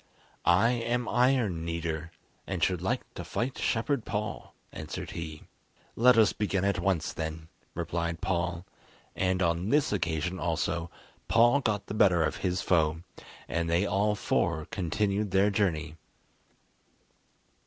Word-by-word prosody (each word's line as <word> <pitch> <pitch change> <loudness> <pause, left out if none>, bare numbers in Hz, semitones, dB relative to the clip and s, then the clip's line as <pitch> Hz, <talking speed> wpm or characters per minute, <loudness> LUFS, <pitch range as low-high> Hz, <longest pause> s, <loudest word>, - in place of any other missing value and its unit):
"I 100 +7 +5
am 120 0 -1
Iron 120 -9 +2
Kneader, 85 -1 -3 0.4
and - - -2
should - - +1
like - - -1
to - - -6
fight 125 +3 -3
Shepherd 120 +2 0
Paul," 105 0 -4 0.2
answered 75 0 -6
he. 80 -2 -6 0.5
"Let 125 +1 +5
us 110 -2 +5
begin 100 -2 -1
at 100 -2 +1
once 85 -3 0
then," 80 0 -5 0.3
replied 85 0 -2
Paul; 90 0 -2 0.5
and 95 0 +1
on 85 +3 0
this 145 -4 +2
occasion 90 -1 -1
also, 85 0 -1 0.4
Paul 120 +4 +5
got 105 -6 -1
the - - -6
better 95 -6 +4
of 75 - -1
his 90 -1 -1
foe, 80 -2 +2 0.4
and 85 0 -1
they 85 +4 +2
all 105 +1 +1
four 85 -5 0
continued 100 +3 -1
their 95 +2 +3
journey. 80 -6 -1
90 Hz, 135 wpm, -29 LUFS, 85-105 Hz, 0.5 s, I